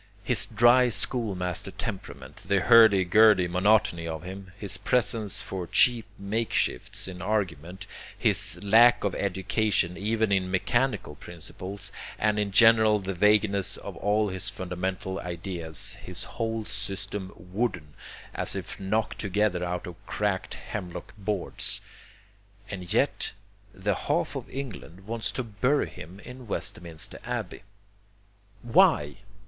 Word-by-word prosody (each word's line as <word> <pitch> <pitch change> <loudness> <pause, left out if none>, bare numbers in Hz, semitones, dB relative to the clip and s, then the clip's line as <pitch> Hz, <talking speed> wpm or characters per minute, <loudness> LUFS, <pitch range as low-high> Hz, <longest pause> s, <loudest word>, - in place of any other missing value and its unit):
His - - 0
dry 120 +3 +5
schoolmaster 100 -8 -1
temperament, 90 - -7
the 100 -1 +1
hurdy 110 -5 +7
gurdy 105 0 +6
monotony 90 -2 +2
of 80 0 -5
him, 95 +1 -8
his 100 -2 -4
preference 110 0 0
for 90 -2 -5
cheap 120 +2 +4
makeshifts 100 - -1
in 90 -2 -7
argument, 95 -2 -2 0.3
his - - +1
lack 115 +4 +6
of 100 -3 0
education 95 -2 0
even 110 +1 0
in 95 -2 +1
mechanical 120 - 0
principles, 95 +5 -7 0.3
and 105 -1 +1
in 105 -1 0
general 110 0 +6
the 95 -1 -4
vagueness 100 0 +2
of 100 - -8
all 105 +2 +1
his 95 -1 -2
fundamental 95 +1 -4
ideas, 85 -3 -4
his - - -3
whole 115 -1 -3
system 95 -1 -4
wooden, 90 -5 -3 0.4
as - - -2
if - - -6
knocked 105 +3 -1
together 100 -2 0
out 90 0 -3
of 90 -1 -10
cracked 100 -3 -1
hemlock 90 -5 -7
boards 100 -2 -2 0.9
and 90 -3 -6
yet - - +1 0.4
the 100 +1 -1
half - - -1
of - - -6
England 115 -9 -7
wants 115 +1 -2
to 130 - -3
bury 125 +6 +1
him 90 0 -11
in 125 +1 -11
Westminster 85 -5 -3
Abbey. - - -4 1.0
Why? 75 -10 +4
100 Hz, 125 wpm, -27 LUFS, 90-110 Hz, 1.0 s, hurdy